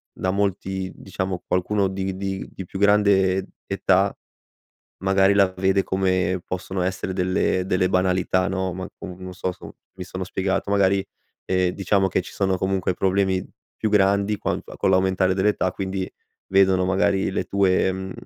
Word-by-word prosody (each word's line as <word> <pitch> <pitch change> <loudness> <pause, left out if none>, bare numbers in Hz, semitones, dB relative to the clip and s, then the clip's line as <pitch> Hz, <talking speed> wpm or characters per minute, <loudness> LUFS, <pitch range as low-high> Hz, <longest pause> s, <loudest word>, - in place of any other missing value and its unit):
da 95 - -2
molti 95 -1 -2
diciamo 95 -1 -4
qualcuno 95 +2 +1
di 95 0 -3
di 95 0 -4
di 95 - -8
più 95 - -7
grande 100 -2 +3 0.2
età, - - +2 0.9
magari 95 +1 +4
la 100 -2 +4
vede 95 +1 +2
come 95 -1 0
possono 95 +1 -4
essere 95 +1 -2
delle 95 0 0
delle 90 -1 +1
banalità 95 0 +1
no, 95 -1 -2
ma 95 +2 -6
comu 90 -1 -8
non 95 0 -8
so 90 0 -2
so 90 - -12 0.2
mi 90 - -5
sono 95 +1 -5
spiegato, 95 +2 -2
magari, 100 -1 +3 0.4
ehm, 90 -1 +2
diciamo 95 0 +1
che 95 - 0
ci - - -10
sono 95 -1 0
comunque 95 0 0
problemi 95 0 +1 0.3
più 110 - -1
grandi, 100 0 +3
quanto - - -4
con - - +1
l'aumentare 95 0 +2
dell'età, 95 -1 +1
quindi 95 -1 -3 0.4
vedono 95 -1 +4
magari 95 +1 +1
le - - -2
tue, 95 -1 +2
mhmm, 95 0 -5
95 Hz, 160 wpm, -23 LUFS, -, 0.9 s, magari